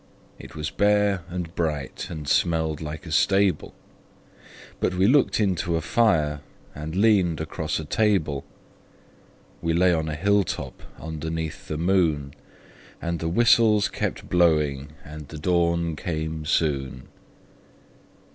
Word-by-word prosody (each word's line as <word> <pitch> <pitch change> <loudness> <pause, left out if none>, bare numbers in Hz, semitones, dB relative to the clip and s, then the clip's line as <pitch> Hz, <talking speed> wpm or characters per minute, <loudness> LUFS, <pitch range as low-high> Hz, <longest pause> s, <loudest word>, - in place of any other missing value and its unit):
It - - -12
was 75 -1 -4
bare 105 -2 +2
and 90 -1 -5
bright, 75 -5 -3
and 75 -3 -7
smelled 80 0 +1
like 75 +1 -6
a 80 - -8
stable 95 +3 +2 1.0
But 90 - 0
we 95 +1 +3
looked 130 +2 +3
into 90 -4 0
a 80 - 0
fire, 75 -7 +2 0.4
we 75 +1 -6
leaned 95 -2 +2
across 80 0 -3
a 80 - -6
table, 80 -7 +1 1.2
We 85 -1 0
lay 90 +1 +4
on 80 -1 -1
a 75 - -3
hilltop 100 +4 0 0.2
underneath 80 0 -5
the 75 - -3
moon; 80 -5 +1 0.7
And 85 -1 -3
the 80 - -2
whistles 110 +1 +4
kept - - -4
blowing, 75 -5 +1
and 75 -1 -9
the 80 - -9
dawn 85 0 +1
came 80 -1 -4
soon. 70 -5 -1
80 Hz, 130 wpm, -24 LUFS, 75-90 Hz, 1.2 s, lay